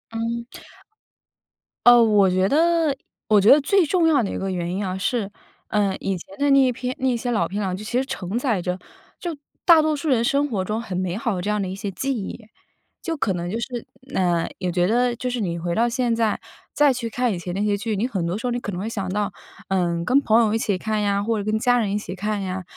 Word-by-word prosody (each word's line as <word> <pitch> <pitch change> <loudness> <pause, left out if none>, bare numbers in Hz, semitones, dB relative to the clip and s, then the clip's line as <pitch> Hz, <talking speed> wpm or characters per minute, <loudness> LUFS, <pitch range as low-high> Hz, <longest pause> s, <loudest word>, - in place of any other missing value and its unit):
嗯。 235 +1 -2 1.4
呃， 245 0 +9
我 210 -4 +4
觉 185 +1 +2
得 325 0 +2 0.3
我 210 -2 +5
觉 205 - +6
得 295 - +8
最 365 +5 +3
重 335 +1 +2
要 285 -7 +4
的 195 - -2
一 - - -3
个 195 - -3
原 175 -1 -2
因 200 +1 -2
啊， 185 0 -3
是， 200 +2 -1 0.4
呃， 205 -2 +1
以 195 -1 -2
前 285 +12 -12
的 285 0 +1
那 275 - +6
一 255 -1 +3
片 250 +1 -4
那 260 -1 +1
些 240 +1 -3
老 190 -7 +1
片 200 +5 -3
啊， 185 -2 -1
其 205 - -8
实 250 +4 -1
承 205 -3 -3
载 230 -8 0
着， 180 +1 -3 0.4
就 340 -3 -4 0.3
大 330 -3 +8
多 310 0 +1
数 300 +1 -4
人 240 -4 +3
生 280 +4 +2
活 200 -5 -1
中 215 +4 -2
很 185 -6 -5
美 185 0 -2
好 230 -4 -1
的 180 - -3
这 205 - -3
样 210 -1 0
的 190 - -2
一 185 - -5
些 195 0 -4
记 270 +8 -2
忆。 210 +2 -7 0.5
就 330 -2 -3
可 205 -9 0
能 175 0 -4
就 225 - -2
是 240 -1 -5 0.3
呃， 175 -3 +1
也 180 -2 -1
觉 175 0 +2
得 245 +2 +2
就 250 - -3
是 245 -1 -2
你 170 -4 -2
回 170 0 -2
到 235 +1 +2
现 240 -1 0
在， 225 -2 0 0.3
再 290 -2 +4
去 235 -2 -4
看 245 -2 0
以 - - -3
前 175 0 -5
那 195 - -2
些 205 -1 +2
剧， 205 0 -2
你 235 +5 0
很 190 -9 -2
多 175 +4 -2
时 250 - -3
候 - - 0
你 240 - -1
可 205 - -4
能 180 - -5
会 205 - -3
想 195 -5 -3
到， 205 +1 -1 0.3
嗯， 170 -3 0
跟 270 +8 +4
朋 225 -2 +4
友 215 -2 +2
一 225 - +2
起 205 -3 0
看 215 +2 -1
呀， 200 -1 +1
或 225 +1 0
者 205 - -2
跟 215 +1 0
家 245 +1 +3
人 210 -4 0
一 205 - 0
起 190 - -7
看 210 +1 -2
呀， 185 -1 -4
215 Hz, 280 characters per minute, -23 LUFS, 190-250 Hz, 1.4 s, 呃